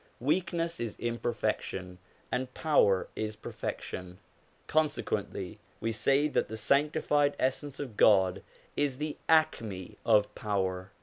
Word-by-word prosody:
Weakness 165 +4 0
is 115 -2 -3
imperfection 95 -6 -2 0.3
and 125 0 -1
power 100 -12 +3
is 110 0 -3
perfection; 90 -3 -6 0.5
consequently 105 -11 -1 0.2
we 115 +1 -1
say 135 +7 +3
that 150 - 0
the 110 - -6
sanctified 145 +3 +2
Essence 135 +2 -1
of 125 -8 -6
God 95 -4 +5 0.3
is 140 -3 0
the 150 +1 -3
acrne 115 - +2
of 105 -2 +4
power. 95 -3 -2
120 Hz, 115 wpm, -30 LUFS, 100-145 Hz, 0.5 s, God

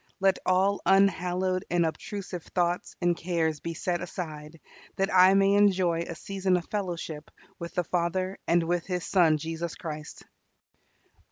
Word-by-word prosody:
Let 195 -1 +3
all 190 +2 +2
unhallowed 185 -1 +2
and 175 -1 +2
obtrusive 185 +2 -5
thoughts 175 -1 -1
and 175 0 +3
cares 165 -3 -1
be 165 0 -5
set 175 +1 -2
aside, 160 -3 -7 0.4
that 195 +1 0
I 185 +1 +7
may 195 0 +4
enjoy 190 -4 +3
a 170 - -6
season 190 0 0
of 175 - -5
fellowship 170 -6 -4 0.3
with 170 0 -7
the 180 - +1
Father 185 +3 -1
and 170 0 +3
with 175 +1 -1
His 180 -2 -2
Son 165 -5 +4
Jesus 165 +2 -4
Christ. 155 -3 -7
175 Hz, 150 wpm, -27 LUFS, 165-190 Hz, 0.4 s, I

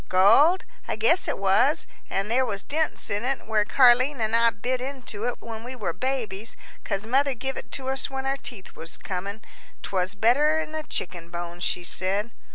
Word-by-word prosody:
"Gold? 230 - +5 0.2
I - - -1
guess 370 -4 +3
it - - -1
was; - - +3 0.2
and 195 +3 -2
there 260 +2 +3
was 200 -5 -3
dents 315 +1 -2
in 205 +2 -1
it, 265 +1 -2
where 220 -1 +2
Car'line 255 +4 +5
an' 220 0 -1
I 230 0 +6
bit 245 +4 -3
into 255 -5 -5
it 245 - -2
when 225 -1 -7
we 255 +2 -7
were 205 -9 -3
babies, 225 -2 -3 0.3
'cause 200 0 -2
mother 270 +3 +2
give 265 +3 -4
it - - -8
to 260 - -3
us 265 0 0
when 265 0 -4
our 270 +1 0
teeth 235 -8 -7
was 165 0 -7
comin' 200 +3 -5 0.4
'twas 185 +1 -1
better'n 300 +9 +3
a 315 - -2
chicken 175 - -4
bone, 170 0 -6
she 175 0 -2
said." 195 +6 -1
230 Hz, 190 wpm, -25 LUFS, 200-265 Hz, 0.4 s, I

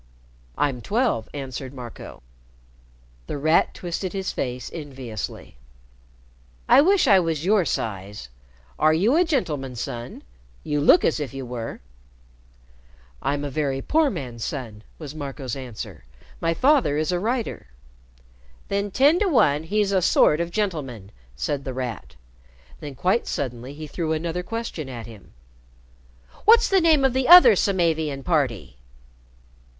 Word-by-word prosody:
"I'm 135 -4 0
twelve," 215 - 0
answered 135 -1 -7
Marco. 120 - -10 1.0
The - - -4
Rat 155 +4 +2
twisted 180 +1 -4
his 190 -1 -3
face 125 -1 -4
enviously. 130 - -7 1.1
"I - - +7
wish 375 +2 +4
I 195 -4 +6
was 165 -3 -2
your 200 -2 +3
size! 100 - -4 0.5
Are 155 +1 +4
you 210 - +2
a 350 - +5
gentleman's 150 - -2
son? 120 0 -6 0.4
You 150 -1 -1
look 330 - +5
as 160 - +1
if 140 -2 -5
you 135 -1 -5
were." 120 -2 -6 1.4
"I'm 145 +1 -1
a 145 - -4
very 140 -2 -1
poor 310 - +2
man's 120 - -6
son," 115 -8 -5 0.2
was 150 -3 -8
Marco's 140 -4 -5
answer. 125 - -8 0.3
"My 165 0 0
father 260 - +3
is 155 +3 0
a 180 - 0
writer." 230 - -3 1.0
"Then, 200 +1 -1
ten 285 - +4
to 420 - +2
one, 150 - +3
he's 200 +4 0
a 190 -2 +2
sort 155 -1 +4
of 170 - -2
gentleman," 150 - -3 0.2
said 140 - -3
The 130 -2 -5
Rat. 125 -5 -5 0.6
Then 145 -2 -8
quite 185 - 0
suddenly 125 0 -4
he 155 +1 -7
threw 160 +1 -3
another 165 +2 -2
question 225 - -5
at 120 -3 -7
him. 110 - -14 1.1
"What's 455 +2 +6
the 385 -2 +4
name 315 -5 +4
of 265 - +2
the 260 0 0
other 360 +7 +9
Samavian 160 -7 0
party?" 135 - -1
155 Hz, 140 wpm, -23 LUFS, 130-200 Hz, 1.4 s, other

